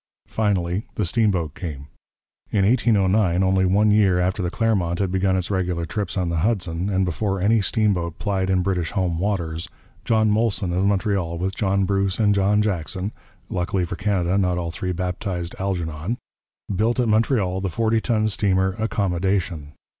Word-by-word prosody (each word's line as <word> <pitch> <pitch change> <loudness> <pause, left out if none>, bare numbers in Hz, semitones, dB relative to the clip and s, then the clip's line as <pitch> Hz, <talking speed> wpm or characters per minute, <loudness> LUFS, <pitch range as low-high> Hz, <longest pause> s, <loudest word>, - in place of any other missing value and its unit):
Finally 100 -3 -1
the 105 - 0
steamboat 90 - +1
came. 75 -7 -6 0.6
In 100 -2 +2
1809, 100 -5 +3
only 95 0 +3
one 105 +3 +3
year 100 -4 +4
after 95 +3 0
the 90 - -1
Clermont 95 -6 0
had 95 -1 -1
begun 95 0 +1
its 90 +2 -2
regular 90 -3 -1
trips 100 +4 -3
on 90 -2 0
the 85 - -1
Hudson, 90 -1 0
and 95 -1 +1
before 95 +3 -1
any 105 +4 +3
steamboat 95 -5 0
plied 95 -3 -1
in 95 -1 +2
British 90 -4 -1
home 90 -4 0
waters, 90 -3 -2 0.3
John 110 -2 +2
Molson 105 -5 0
of 95 +2 +1
Montreal 100 -4 0
with 95 +3 -2
John 100 -1 +1
Bruce 100 -1 0
and 105 -2 +3
John 100 +1 +2
Jackson 95 0 -2 0.4
luckily 90 0 -1
for 85 - -5
Canada 95 -1 0
not 90 -2 +1
all 85 -1 -3
three 90 +2 -3
baptized 90 -1 -3
'Algernon' 90 +1 -2 0.6
built 115 +6 +1
at 125 - +2
Montreal 105 -4 +1
the 95 - -1
40 115 +4 +1
ton 110 -2 +1
steamer 95 -2 +1
Accommodation. 95 -7 -1
95 Hz, 165 wpm, -23 LUFS, 90-105 Hz, 0.6 s, year